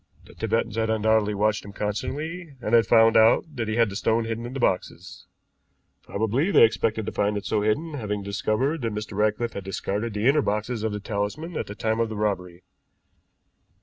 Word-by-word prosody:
The - - -15
Tibetans 105 - -1
had 110 0 0
undoubtedly 110 -1 +2
watched 105 +1 +1
him 100 - -10
constantly, 150 - -4
and 115 -2 -4
had 115 -3 +5
found 115 -1 +5
out 110 +1 +5
that 115 -3 -2
he 110 - -1
had 115 -1 +4
the - - -7
stone 115 +2 +1
hidden 115 +1 -4
in 125 - -8
the 135 - -4
boxes. 95 -6 -2 0.7
Probably 115 - -1
they 200 - +6
expected 110 -1 +2
to - - -3
find 105 0 0
it 100 - -5
so 105 - 0
hidden, 145 +10 0
having 105 -6 -3
discovered 120 +8 -1
that 115 -3 -2
Mr. 105 -1 -5
Ratcliffe 110 +3 0
had 100 - -6
discarded 105 +3 -3
the 105 +3 +1
inner 145 +2 +4
boxes 105 +1 -2
of 110 0 -1
the 105 - -4
talisman 105 - -4
at - - -3
the 105 - -7
time 110 +1 -1
of 115 -1 +1
the 110 - -5
robbery. 90 -4 -2
110 Hz, 205 wpm, -25 LUFS, 105-115 Hz, 0.7 s, they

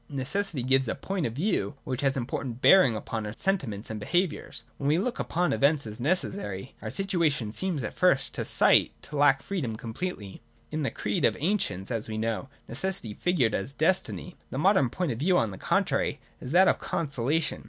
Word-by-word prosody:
Necessity 145 +2 -2
gives 130 0 +3
a - - -1
point 185 +1 -2
of 115 - -6
view 150 - -1
which 130 -1 -3
has 135 -1 +2
important 125 -1 -3
bear 190 +7 +7
ings 115 -4 +1
upon 110 0 -4
our 105 0 -5
sentiments 115 - -2
and 110 - -4
behaviour. 175 - -1 0.3
When 140 - -2
we 150 +3 +4
look 235 +7 -2
upon 175 +1 0
events 140 +5 +2
as 110 -1 -8
necessary, 135 - -1
our - - -4
situation 165 - 0
seems 170 - -2
at 110 - -4
first 175 -7 +2
sight - - +4
to 150 - -8
lack 140 -2 +4
freedom 150 - -3
completely. 110 - -6 0.3
In 155 0 -2
the 135 - 0
creed 105 - -2
of - - +4
the - - -9
ancients, 130 - 0
as 115 -2 -2
we 110 -1 -4
know, 115 +4 -2 0.2
necessity 135 - -3
figured 135 - +1
as 125 +8 -3
Destiny. 180 +2 0
The - - -5
modern 185 - +4
point 175 +3 -2
of 115 - -4
view, 180 +5 +3
on 110 -9 +1
the 95 - -9
contrary, - - 0 0.2
is 125 - -7
that 185 +4 +6
of - - +3
Consolation. 145 +1 -1
140 Hz, 195 wpm, -27 LUFS, 115-180 Hz, 0.3 s, bear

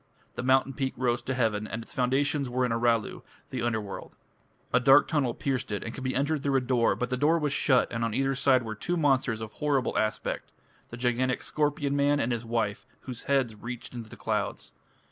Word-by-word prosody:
The - - -4
mountain 130 +1 +3
peak 130 0 -2
rose 120 -1 +1
to 135 - -3
heaven, 110 -4 0
and 115 +2 -5
its - - -10
foundations 135 +2 +1
were 125 +1 +1
in 125 - -1
Aralu, 115 -1 +1 0.3
the 130 - -3
Underworld. 110 -4 -3 0.6
A 125 - +6
dark 135 +3 +6
tunnel 140 -7 0
pierced 130 -5 -2
it 105 - -2
and 115 - -5
could 130 - -7
be 130 0 -1
entered 145 +2 0
through 140 -1 0
a - - +5
door, 125 -5 +2
but 125 +5 -3
the 125 - 0
door 150 +5 +3
was 150 -3 -1
shut 130 -3 +3
and 115 0 -1
on 115 -1 -1
either 135 0 +1
side 130 -1 +3
were 110 -1 -4
two 175 +11 -2
monsters 130 -7 +2
of 110 -1 -6
horrible 140 -2 0
aspect 110 0 -2 0.4
the 115 - -8
gigantic 125 +1 0
"scorpion 145 -1 0
man" 145 0 +3
and 125 -2 0
his 120 -1 -2
wife, 115 -3 -2
whose 125 -3 -7
heads 135 -5 +1
reached 120 +2 -7
to 125 - -7
the 110 -2 -9
clouds. - - -3
125 Hz, 215 wpm, -28 LUFS, 115-135 Hz, 0.6 s, A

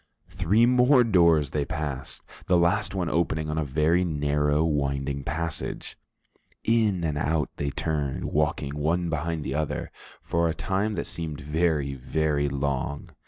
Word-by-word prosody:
Three 95 +6 +3
more 125 +1 +5
doors 85 - +4
they 75 - 0
passed, 70 -2 -5 0.2
the 90 - +4
last 90 +4 +1
one 90 -3 -1
opening 80 -2 0
on 80 - -1
a - - 0
very 75 +5 +2
narrow, 75 -2 +1
winding 70 -3 -1
passage. 80 +2 -4 0.7
In 110 -6 +2
and 75 -3 -1
out 80 -2 0
they 70 - -1
turned, 70 -2 -2
walking 75 -1 -1
one 85 +3 0
behind 80 0 -2
the 65 - -3
other, 75 +1 -2 0.3
for 85 0 +1
a 80 - -2
time 100 +6 -1
that 85 - -2
seemed 80 -3 -5
very, 75 -1 0
very 70 +2 0
long. 70 0 -2
80 Hz, 150 wpm, -26 LUFS, 70-85 Hz, 0.7 s, more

